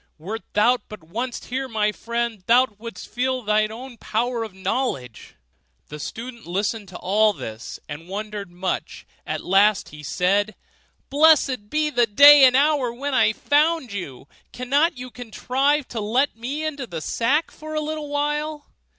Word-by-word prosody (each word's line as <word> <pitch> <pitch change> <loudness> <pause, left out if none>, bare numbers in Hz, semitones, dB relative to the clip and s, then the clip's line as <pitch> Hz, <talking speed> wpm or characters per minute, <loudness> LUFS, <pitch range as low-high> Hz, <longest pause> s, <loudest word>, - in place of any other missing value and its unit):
Wert 205 +8 -6
thou 240 +4 +4
but 215 -6 -10
once 235 +10 -5
here, 265 +2 -3
my 215 -3 0
friend, 235 -1 -3
though 240 -1 +4
wouldst 230 -5 -8
feel 255 -1 -2
and 215 0 +2
own 255 +4 -8
the 240 - -16
power 235 +1 -1
of 220 - -7
knowledge. 190 - -3 0.5
The 150 - -8
student 235 - -7
listened 205 +3 -2
to 180 -1 -9
all 210 +3 +2
this 110 - -8
and 155 +4 -8
wondered 205 -1 -5
much; 180 +1 -4 0.2
at - - -3
last 200 +2 +3
he 150 0 -11
said, 195 +8 0 0.6
'Blessed 280 -7 +4
be 305 +2 0
the 240 -3 +3
day 285 +6 +9
and 255 -1 +5
hour 280 -3 +3
when 275 +4 -4
I 220 -4 +4
found 290 0 +1
you; 140 -9 -7 0.2
cannot 285 +6 +1
you 250 0 -8
contrive 260 +4 -1
to 230 - -4
let 245 +6 +1
me 270 +7 -4
into 285 -5 -4
the 170 -5 -5
sack 275 - 0
for 310 0 -8
a - - +1
little 305 -1 -4
while? 295 +1 -2
235 Hz, 165 wpm, -23 LUFS, 205-275 Hz, 0.6 s, day